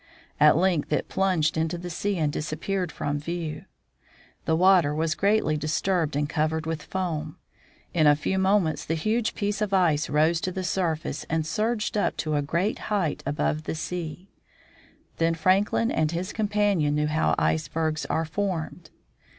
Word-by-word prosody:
At 150 +1 +6
length 175 -5 +1
it 150 - 0
plunged 180 -5 +1
into 160 +2 0
the 175 +1 -6
sea 200 +3 -1
and 150 -3 0
disappeared 170 +4 -2
from 145 0 -2
view. 160 -1 -5 0.8
The 160 - +2
water 175 -4 +4
was 160 0 0
greatly 200 -5 +2
disturbed 160 +1 0
and 145 0 0
covered 155 +1 -1
with 160 -1 -3
foam. 160 -5 -3 0.6
In 155 -3 +4
a 145 - +7
few 190 +6 -1
moments 190 -6 +2
the 160 - -2
huge 215 +8 0
piece 205 0 -2
of 200 -2 +1
ice 165 -5 +2
rose 160 +3 +2
to 185 - -2
the 185 +1 -4
surface 165 -5 -2
and 160 0 -1
surged 215 +7 -1
up 205 - 0
to 155 -1 -2
a 145 - +2
great 170 +9 -1
height 195 -8 0
above 150 +1 -1
the - - -3
sea. 175 +2 -5 0.9
Then 165 0 +2
Franklin 195 +7 +2
and 155 -1 +1
his 175 +3 -3
companion 205 -8 +1
knew 150 0 +1
how 150 - +1
icebergs 155 - 0
are 165 - 0
formed. 175 -1 -3
165 Hz, 165 wpm, -26 LUFS, 155-190 Hz, 0.9 s, a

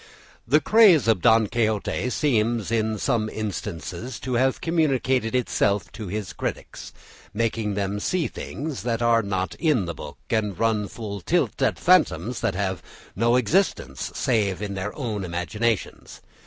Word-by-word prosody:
The 145 +6 +5
craze 185 - +5
of 110 -6 +3
Don 110 +3 +5
Quixote 110 +2 -1
seems, 115 -6 0
in 110 -1 0
some 110 -1 0
instances, 105 - -5
to 130 - -3
have 130 +2 +2
communicated 130 -7 +1
itself 100 -7 0
to 110 - -7
his 100 0 -4
critics, - - -5 0.4
making 110 -2 -1
them 100 0 -2
see 175 - 0
things 145 -1 -6
that 120 -1 -1
are 115 -1 +4
not 95 -5 -2
in 140 - +2
the 85 - -4
book 75 -2 -9
and 105 -4 0
run 110 -2 +1
full 100 -3 -6
tilt - - 0
at - - +2
phantoms 110 +10 +2
that - - 0
have 95 -2 -2 0.3
no 115 +3 +3
existence 125 - 0
save 105 -7 +1
in 100 -1 -4
their 95 +2 -3
own 110 -8 -3
imaginations. 95 +5 -2
110 Hz, 150 wpm, -24 LUFS, 100-125 Hz, 0.4 s, The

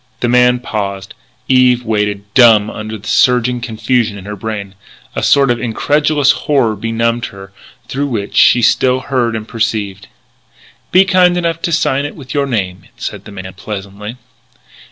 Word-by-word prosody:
The 120 - +1
man 125 0 +4
paused: 100 -5 -5 0.3
Eve 125 -2 +3
waited, 105 -2 -1
dumb 110 -4 +5
under 110 0 -6
the 105 +1 -13
surging 125 -1 +2
confusion 110 -1 -1
in 95 - -11
her 105 0 -6
brain. 100 -1 -5 0.4
A - - -2
sort 140 -3 +4
of 120 -1 -1
incredulous 145 +4 +2
horror 135 -8 0
benumbed 115 +2 -1
her, 95 -1 -12 0.4
through 140 +2 -2
which 110 -6 -4
she 120 - +5
still 130 +3 +3
heard 125 -4 -1
and 110 0 -5
perceived. 105 -4 -3 0.8
"Be 185 +1 +5
kind 180 -2 +3
enough 165 -2 -1
to 170 - -2
sign 140 -4 +1
it 145 - -6
with 135 -4 -9
your 140 -1 0
name," 95 -7 -3
said - - -6
the - - -10
man 95 -1 -8
pleasantly. 100 +3 -7
115 Hz, 160 wpm, -15 LUFS, 105-130 Hz, 0.8 s, dumb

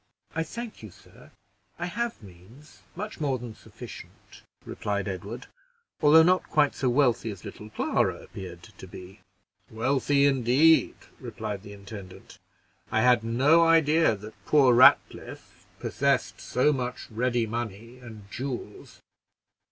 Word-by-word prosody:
"I 165 - -1
thank 230 +8 -7
you, 110 - -9
sir, - - -19 0.5
I 175 - -3
have 225 - -4
means, 100 - -17
much 210 +3 -6
more 140 -3 0
than 120 -2 -8
sufficient," - - -13 0.2
replied 100 -1 -3
Edward, 100 +4 -6 0.6
"although 155 +1 +7
not 185 +2 +2
quite 150 -2 +2
so 130 - -1
wealthy 125 -3 +2
as 100 -5 -9
little 105 - -9
Clara - - 0
appeared 90 -2 -10
to 95 - -13
be." 95 +3 -12 0.5
"Wealthy, 135 +4 +1
indeed!" 140 +4 +4 0.2
replied 110 -5 -6
the 100 0 -11
intendant. 100 -2 -11 0.5
"I 110 - +2
had 125 -2 +4
no 135 +9 +4
idea 160 -4 +4
that 105 0 -13
poor 135 -5 +5
Ratcliffe 125 +2 +3
possessed - - -1
so 130 +5 +1
much 125 -2 -4
ready 120 +1 0
money 115 +1 -6
and 110 -4 -11
jewels. 125 -5 -7
120 Hz, 130 wpm, -26 LUFS, 105-145 Hz, 0.6 s, although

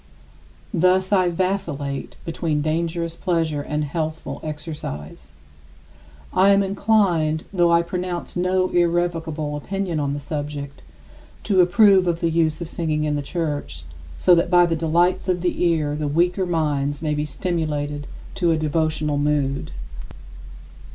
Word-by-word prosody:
Thus 185 +2 +3
I 185 -2 +4
vacillate 170 -6 -2
between 160 -3 -1
dangerous 165 +1 -1
pleasure 165 -4 -1
and 150 +1 -2
healthful 155 +2 -4
exercise. 150 - -7 1.0
I 190 +2 +5
am 200 0 +5
inclined 190 -6 +1
though 175 -2 +3
I 170 0 +4
pronounce 180 0 -4
no 185 +1 +1
irrevocable 165 -3 0
opinion 180 +1 -3
on 140 -1 -1
the - - -4
subject 145 -1 -5 0.6
to 190 -3 +4
approve 190 +1 +5
of 170 -1 0
the 165 -1 0
use 160 0 +1
of 165 - -5
singing 155 -2 -1
in 150 -1 0
the 145 - -1
church, 145 - -4 0.3
so 180 - +5
that 170 0 +3
by 175 -1 +6
the 165 -1 0
delights 170 +4 +1
of 180 -1 +1
the 180 0 -1
ear 155 -4 +1
the 150 0 -2
weaker 175 +5 +1
minds 145 -3 -1
may 150 -1 0
be 150 0 -1
stimulated 150 -2 -3 0.3
to 175 -3 +1
a 165 - +3
devotional 155 -1 0
mood. 145 0 0
165 Hz, 140 wpm, -22 LUFS, 150-175 Hz, 1.0 s, by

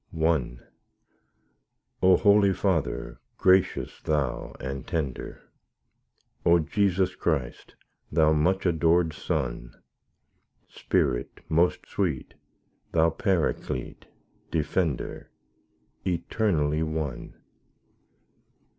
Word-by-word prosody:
I 80 -7 +1 1.4
O 95 0 +6
Holy 100 -2 +5
Father, 80 -12 -1 0.2
gracious 95 0 +2
Thou 75 -5 -2
and 65 0 -5
tender; 70 -6 -4 1.0
O 85 0 +5
Jesus 95 +2 +1
Christ, 70 -7 -3 0.4
Thou 80 0 +4
much 90 +6 +2
adorèd 85 -1 +2
Son; 65 -7 -3 0.9
Spirit - - -1
most 85 +3 +2
sweet, 85 -10 -2 0.6
Thou 80 0 +4
Paraclete, 85 - -2 0.4
Defender, 80 -2 -2 0.7
Eternally 85 -4 0
one! 80 -5 -4
80 Hz, 75 wpm, -26 LUFS, 75-90 Hz, 1.4 s, O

